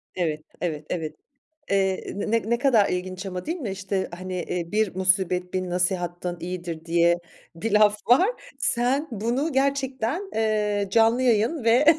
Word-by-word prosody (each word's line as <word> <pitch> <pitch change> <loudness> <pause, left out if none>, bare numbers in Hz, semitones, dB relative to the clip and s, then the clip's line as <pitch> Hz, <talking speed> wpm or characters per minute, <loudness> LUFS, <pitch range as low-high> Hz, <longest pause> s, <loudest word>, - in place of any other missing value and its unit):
Evet. 155 -4 -1 0.2
Evet. 155 -4 -3
Evet, 160 -3 -3 0.6
eee, 190 -1 +1
n 215 +2 -1
ne 235 - +3
kadar 240 -6 +4
ilginç 185 +1 -3
ama, 185 -2 -5
değil 330 +3 -2
mi? 255 - -4
İşte 190 0 -2
hani, 185 +1 -6
eee, 170 -2 -4
"Bir 210 -3 +1
musibet, 185 -1 +1
bin 185 -1 -1
nasihatten 175 -1 -1
iyidir." 170 -2 -5
diye 170 +1 +3 0.4
bir 215 +7 -3
laf 210 0 +5
var. 275 - +6 0.3
Sen 260 +3 +1
bunu 240 +8 -1
gerçekten, 270 - 0
eee, 210 -2 +1
canlı 230 +3 +4
yayın 240 +4 +2
ve 235 +5 +4
200 Hz, 150 wpm, -25 LUFS, 180-235 Hz, 0.6 s, var